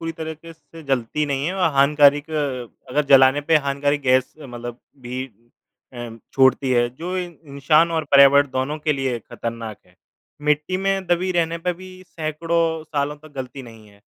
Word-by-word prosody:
पूरी 165 0 -4
तरीके 160 0 -8
से 165 - -26
से 165 -1 -11
जलती 135 +1 -1
नहीं 140 0 -2
है 180 - -2
और 180 -4 +1
हानिकारक 145 +1 +4 0.6
अगर 150 +4 0
जलाने 135 +1 +6
पे 155 +2 +3
हानिकारक 145 0 0
गैस 130 -1 +2
मतलब 120 -4 -8 0.2
भी 125 +1 -5 0.7
उम, 120 -2 -8
छोड़ती 130 0 +3
है 120 -1 +3
जो 180 +5 -4
इं 180 -1 -4 0.2
इंसान 155 +4 +3
और 160 -1 -1
पर्यावरण 140 +1 +7
दोनों 130 +4 -2
के 150 0 0
लिए 135 -4 -2
खतरनाक 115 -1 -7
है। 90 - -26 0.5
मिट्टी 150 +5 +1
में 195 0 -1
दबी 175 +2 +1
रहने 170 -1 0
पे 180 +2 -1
भी 185 +2 -12 0.2
सैकड़ों 165 +1 -1
सालों 145 -1 -2
तक 155 0 -17
गलती 130 +1 -6
नहीं 115 -3 -14
है 100 0 -22
145 Hz, 175 wpm, -21 LUFS, 130-165 Hz, 0.7 s, पर्यावरण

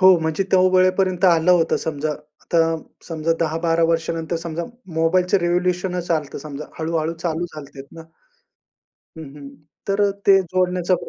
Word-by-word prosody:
हो, 185 -2 +7
म्हणजे 160 +4 0
त्या 185 - +5
वेळेपर्यंत 185 0 +2
आलं 170 -1 +4
होतं 170 -2 +3
समजा. 155 -1 -3 0.3
आता 170 - 0 0.5
समजा 165 0 -1
10-12 165 +1 +1
वर्षानंतर 165 0 -1
समजा 165 0 -4 0.3
मोबाईलचं 180 +4 +2
रेवोल्युशनचं 180 0 0
आलतं 150 -3 -4
समजा, 145 0 -7
हळू-हळू 160 0 -1
चालू 170 0 -1
झालते 145 -4 -11
ना. 165 - -10 1.2
हं, 160 - -8
हं. 140 -1 -10 0.4
तर 200 +1 +2 0.2
ते 195 -1 +7
जोडण्याचा, 180 0 0
170 Hz, 135 wpm, -21 LUFS, 160-180 Hz, 1.2 s, हो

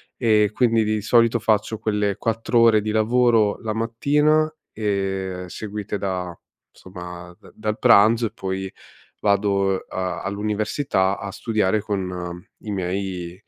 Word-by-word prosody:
e 110 -3 +3
quindi 115 -3 +3
di 110 0 -1
solito 115 +1 +3
faccio 110 0 0
quelle 105 -2 0
4 115 +1 0
ore 115 -2 +6
di 110 - -2
lavoro 110 -1 +3
la 110 -2 -3
mattina 150 +7 +2 0.2
e 95 -3 -2
seguite 105 +2 -5
da, 90 -4 -4 0.4
insomma, 90 -1 -10
da - - -17
dal 110 0 -3
pranzo 115 0 +5
e - - -11
poi 95 0 -4 0.5
vado, 100 -1 +1
a 95 -1 -4
all'università 105 0 -1
a 100 - -6
studiare 110 -2 0
con 90 -4 -4 0.2
i 105 - -7
miei 90 -2 -3
105 Hz, 130 wpm, -22 LUFS, 95-110 Hz, 0.5 s, ore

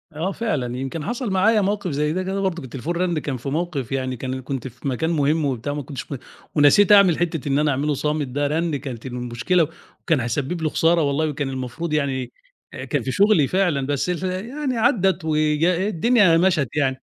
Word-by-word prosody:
آه 170 +5 -1
فعلًا 145 - -2
يمكن 135 +4 -4
حصل 240 +2 -3
معايا 210 +3 +3
موقف 200 -2 -1
زي 150 +2 0
ده 185 +2 -1
كده 190 +1 -2
برضك، 185 -5 -2
التليفون 135 +6 -5
رنّ 175 -2 0
كان 140 -3 -4
في 125 +3 -5
موقف 150 -4 -3
يعني 130 -1 -2
كان 130 +1 -4
كنت 130 0 -4
في 125 +2 -8
مكان 135 +5 -1
مهم 155 -1 +1
وبتاع، 135 +1 -2
ما 145 - -3
كنتش 135 +1 -8
م - - -2 0.4
ونسيت 155 +7 +5
أعمل 200 -5 +7
حتة 165 -4 -2
إن 140 +1 +2
أنا 150 0 +2
أعمله 145 +3 0
صامت 150 +1 -1
ده 145 +3 -1
رنّ 160 +1 -1
كانت 135 -5 -6
المشكلة 125 +7 0 0.3
وكان 160 -5 +1
هيسبب 135 +8 -2
لي 155 - +1
خسارة 165 +2 +3
والله، 150 +1 0
كان 145 -1 -3
المفروض 130 +5 -4
يعني 135 -4 -1 0.6
كان - - 0
في - - -2
شغلي 200 -8 +4
فعلًا 175 -7 +1
بس 145 +4 -1
ال 180 0 -2 0.3
يعني 275 -2 -2
عدّت 195 - +2
وج 155 0 +1
الدنيا 185 +1 +3
مشَت 170 -7 +2
يعني. 135 -3 0
150 Hz, 195 wpm, -22 LUFS, 135-180 Hz, 0.6 s, أعمل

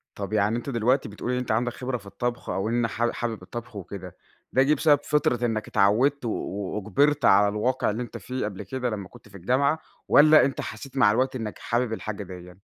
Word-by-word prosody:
طَب 100 +1 -5
يعني 105 +2 +2
أنت 120 - -5
دلوقتي 120 0 +1
بتقول 105 +4 -4
إن 125 - 0
أنت 125 -3 -2
عندك 120 +2 0
خبرة 125 0 -3
في 100 - -17
الطبخ، 120 +5 -4
أو 100 +3 -1
إن 120 0 +1
حاب 120 +3 -1
حابب 115 -2 -4
الطبخ 120 -2 -8
وكده، 95 -1 -8 0.3
ده 130 - +4
جِه 150 +2 +3
بسبب 150 -2 +4
فطرة 125 -5 +1
إنك 110 -2 -2
اتعوّدت 125 +7 +2
و - - 0
وأُجبَرت 105 +9 0
على 100 +1 +6
الواقع 110 +5 0
اللي 115 +4 -2
أنت 120 - -8
فيه 130 -3 -4
قبل 105 -1 -5
كده 125 +5 -3
لمّا 100 -4 -5
كنت 105 - -16
في 100 - -12
الجامعة، 135 - +1 0.3
والَّا 155 0 +7
أنت 135 - -2
حسيت 130 +5 -8
مع 105 -5 +5
الوقت 130 +3 +1
إنك 110 -4 -5
حابب 120 -1 -1
الحاجة 110 -2 -5
ديَّة؟ 90 -1 -10
115 Hz, 215 wpm, -25 LUFS, 105-130 Hz, 0.3 s, والَّا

